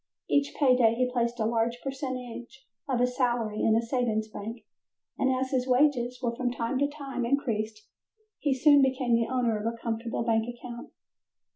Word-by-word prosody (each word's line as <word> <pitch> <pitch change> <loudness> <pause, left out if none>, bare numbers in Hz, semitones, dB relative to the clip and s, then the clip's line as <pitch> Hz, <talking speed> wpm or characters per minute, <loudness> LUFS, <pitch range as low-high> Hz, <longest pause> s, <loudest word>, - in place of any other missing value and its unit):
Each 285 0 +1
pay 265 -4 +5
day 230 -2 +4
he 250 +1 0
placed 235 0 0
a 220 - +1
large 230 +1 0
percentage 260 -2 -6 0.2
of 255 -2 +1
his 250 0 +1
salary 240 -5 0
in 220 - +4
a 230 - +2
savings 230 -3 0
bank, 220 +2 -7 0.6
and 265 - +3
as 260 0 -1
his 255 -1 0
wages 250 -2 +2
were 235 -1 0
from 250 0 -1
time 245 +2 -2
to 285 - +3
time 280 -4 -5
increased, 220 -4 -1 0.5
he 290 - 0
soon 285 +2 +6
became 260 -2 +1
the 230 +1 +2
owner 240 -4 +1
of 225 +2 -1
a 230 - -10
comfortable 230 0 -3
bank 225 -1 +1
account. 240 0 -8
245 Hz, 180 wpm, -28 LUFS, 230-260 Hz, 0.6 s, soon